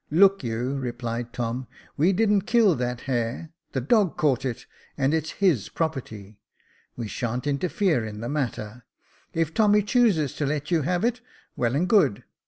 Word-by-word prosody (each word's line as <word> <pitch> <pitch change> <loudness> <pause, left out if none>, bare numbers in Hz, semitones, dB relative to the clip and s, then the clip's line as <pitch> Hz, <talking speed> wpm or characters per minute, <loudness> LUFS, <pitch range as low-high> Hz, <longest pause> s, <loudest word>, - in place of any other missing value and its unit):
" - - -46
Look 195 -4 +4
you," 120 +4 -2
replied 120 -2 -4
Tom, 120 +1 -3
" - - -27
we 165 +6 +3
didn't 205 0 +2
kill 225 -6 +5
that 125 -2 -3
hare, 125 +4 -2 0.2
the 130 - -1
dog 195 - +2
caught 135 -3 +1
it, 125 -3 -4 0.3
and 140 +1 +1
it 160 -1 +1
is 160 - -5
his 175 - +1
property. 110 -10 -4 0.6
We 120 - -4
sba'n't 120 +4 -3
inter 145 +5 0
fere 175 - +1
in 105 -1 -6
the 115 - -4
matter. 125 -5 -3 0.5
If 165 -1 0
Tommy 210 0 +4
chooses 205 - +2
to 145 - 0
let 150 +2 -3
you 165 -2 +3
have 175 +7 0
it, 245 +1 0 0.3
well 120 +1 0
and 170 +6 +1
good. 195 - +3
140 Hz, 185 wpm, -25 LUFS, 120-180 Hz, 0.6 s, kill